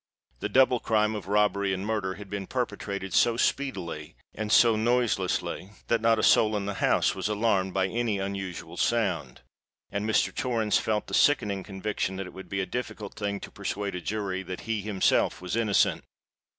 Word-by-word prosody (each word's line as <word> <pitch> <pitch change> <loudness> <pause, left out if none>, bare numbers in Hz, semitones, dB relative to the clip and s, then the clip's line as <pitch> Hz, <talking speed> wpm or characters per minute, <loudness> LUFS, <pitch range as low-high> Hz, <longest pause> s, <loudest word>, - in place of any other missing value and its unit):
The - - -3
double 130 -2 +4
crime 105 -1 +1
of 105 -3 -6
robbery 100 -1 +2
and 95 +2 -5
murder, 105 -4 -1
had 105 -1 -10
been 100 -1 -5
perpetrated 100 -6 -3
so 115 -1 +4
speedily 95 - -2 0.2
and 105 0 -4
so 115 -1 +6
noiselessly, 110 -5 0 0.2
that 115 -1 +2
not 115 0 +4
a 110 - -1
soul 110 -1 +5
in 100 - -3
the 100 - -2
house - - +3
was - - -2
alarmed 100 -3 +1
by 95 -1 +2
any 115 +1 -1
unusual 95 -2 -5
sound—and 100 - -3
Mr. 110 - +2
Torrens 115 -4 +1
felt 105 -1 -1
the - - -10
sickening 105 -9 +3
conviction 95 0 -3
that 95 +1 -4
it 90 - -10
would 95 - -10
be 95 0 -1
a - - -1
difficult 110 -4 -5
thing 100 -1 -3
to - - -9
persuade 100 0 -3
a 90 - -4
jury 100 -1 -2
that 95 0 -7
he 110 -1 -2
himself 100 -2 +1
was 90 +3 -4
innocent! 110 -4 +2
100 Hz, 180 wpm, -27 LUFS, 95-110 Hz, 0.2 s, so